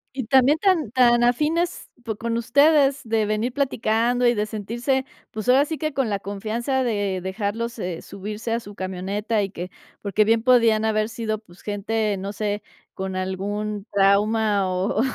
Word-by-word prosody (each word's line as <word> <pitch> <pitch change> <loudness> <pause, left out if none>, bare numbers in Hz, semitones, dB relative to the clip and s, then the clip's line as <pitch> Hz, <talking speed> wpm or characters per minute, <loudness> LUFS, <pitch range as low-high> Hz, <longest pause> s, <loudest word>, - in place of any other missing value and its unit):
Y 260 - -3
también 265 +5 +4
tan 330 - +1
tan 240 -1 +4
afines 305 +8 0
po 220 -3 -3
con 230 +2 -2
ustedes 280 +3 +4
de 225 -1 0
venir 215 +4 -1
platicando 245 -2 +1
y 240 - +5
de 210 -2 -1
sentirse, 235 +5 -2 0.3
pues, 220 +3 -4
ahora 270 +3 +5
sí 320 +1 -4
que 310 -1 -3
con 270 -5 0
la 200 - -1
confianza 225 +7 -2
de 205 -5 -1
dejarlo, 205 +4 -2
eh, 180 -5 -4
subirse 210 +3 -5
a 230 - 0
su 205 -3 -11
camioneta, 195 +4 -2
y 195 - -3
que 180 -1 -7 0.3
porque 210 +1 +2
bien 225 +1 +2
podían 230 -3 +4
haber 215 0 +1
sido, 220 -1 -3
pues, 185 -4 -19
gente, 210 0 -1
no 195 +2 -5
sé, 205 0 -2 0.3
con 190 0 -4
algún 205 +2 -3
trauma 200 0 +3
o 185 +4 0
220 Hz, 170 wpm, -23 LUFS, 205-245 Hz, 0.3 s, y